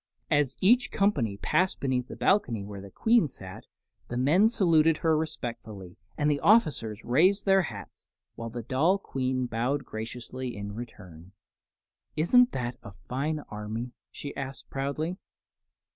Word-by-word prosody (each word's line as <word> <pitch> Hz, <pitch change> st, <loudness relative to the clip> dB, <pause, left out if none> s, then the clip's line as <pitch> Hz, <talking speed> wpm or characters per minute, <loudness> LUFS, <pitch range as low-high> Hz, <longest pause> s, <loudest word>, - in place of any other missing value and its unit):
As 145 Hz, -2 st, +2 dB
each 240 Hz, +6 st, +4 dB
company 140 Hz, -, +1 dB
passed 185 Hz, -, +1 dB
beneath 130 Hz, -2 st, -1 dB
the -, -, -8 dB
balcony 125 Hz, -, +1 dB
where 100 Hz, -1 st, -8 dB
the 100 Hz, -, -10 dB
Queen 225 Hz, -, +3 dB
sat, 95 Hz, -8 st, -10 dB, 0.4 s
the 120 Hz, -, -4 dB
men 165 Hz, -, +4 dB
saluted 165 Hz, -7 st, +4 dB
her 160 Hz, -1 st, +2 dB
respectfully 115 Hz, -, -5 dB, 0.2 s
and 150 Hz, -, +1 dB
the 145 Hz, -1 st, +2 dB
officers 145 Hz, -, +2 dB
raised 180 Hz, -, +3 dB
their 195 Hz, -1 st, +5 dB
hats, 165 Hz, -, -8 dB, 0.3 s
while 115 Hz, 0 st, -6 dB
the 120 Hz, +1 st, -6 dB
doll 150 Hz, -, +2 dB
Queen 130 Hz, -7 st, -2 dB
bowed 125 Hz, +4 st, -1 dB
graciously 120 Hz, +2 st, -6 dB
in 100 Hz, 0 st, -5 dB
return. 95 Hz, -6 st, -10 dB, 0.8 s
"Isn't 245 Hz, -, +5 dB
that 125 Hz, -1 st, -3 dB
a -, -, -9 dB
fine 135 Hz, +11 st, -3 dB
army?" 110 Hz, +3 st, -5 dB, 0.2 s
she 145 Hz, -, -8 dB
asked, 135 Hz, 0 st, -7 dB
proudly. 140 Hz, +6 st, -2 dB
130 Hz, 145 wpm, -28 LUFS, 115-160 Hz, 0.8 s, their